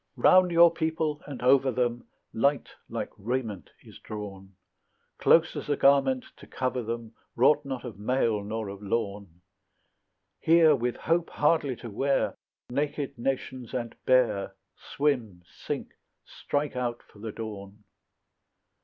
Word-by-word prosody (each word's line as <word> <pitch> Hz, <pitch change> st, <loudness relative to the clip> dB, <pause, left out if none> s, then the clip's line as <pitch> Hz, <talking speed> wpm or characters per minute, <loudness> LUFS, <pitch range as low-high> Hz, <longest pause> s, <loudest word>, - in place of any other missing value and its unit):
Round 185 Hz, -1 st, +6 dB
your 170 Hz, 0 st, +6 dB
people 160 Hz, -2 st, -1 dB
and 135 Hz, -4 st, -7 dB
over 135 Hz, +1 st, +5 dB
them 120 Hz, -1 st, -1 dB, 0.3 s
Light 140 Hz, +3 st, +1 dB, 0.2 s
like -, -, -4 dB
raiment 115 Hz, -2 st, -3 dB
is -, -, -14 dB
drawn, 95 Hz, -2 st, -8 dB, 0.6 s
Close 165 Hz, +1 st, +4 dB
as -, -, -6 dB
a 145 Hz, -, +1 dB
garment 135 Hz, -2 st, +4 dB
to -, -, -14 dB
cover 130 Hz, -1 st, -2 dB
them 115 Hz, 0 st, -5 dB, 0.2 s
Wrought 145 Hz, +5 st, +4 dB
not 130 Hz, -3 st, -5 dB
of 110 Hz, -5 st, -8 dB
mail 110 Hz, -2 st, +1 dB
nor 110 Hz, +1 st, -4 dB
of 100 Hz, 0 st, -8 dB
lawn; 100 Hz, -4 st, -3 dB, 1.0 s
Here, 160 Hz, -2 st, +5 dB
with 120 Hz, -1 st, -1 dB
hope 170 Hz, +1 st, 0 dB
hardly 145 Hz, -3 st, +1 dB
to 115 Hz, -1 st, -9 dB
wear, 135 Hz, +6 st, 0 dB, 0.4 s
Naked 145 Hz, +1 st, -2 dB
nations 130 Hz, -1 st, -3 dB
and 120 Hz, -2 st, -3 dB
bare 120 Hz, -6 st, +2 dB, 0.2 s
Swim, 120 Hz, -11 st, -2 dB
sink, -, -, -6 dB, 0.3 s
strike 145 Hz, -1 st, -3 dB
out 120 Hz, -2 st, -3 dB
for 105 Hz, -, -20 dB
the 110 Hz, +1 st, -5 dB
dawn. 105 Hz, -2 st, -8 dB
125 Hz, 135 wpm, -28 LUFS, 110-145 Hz, 1.0 s, Round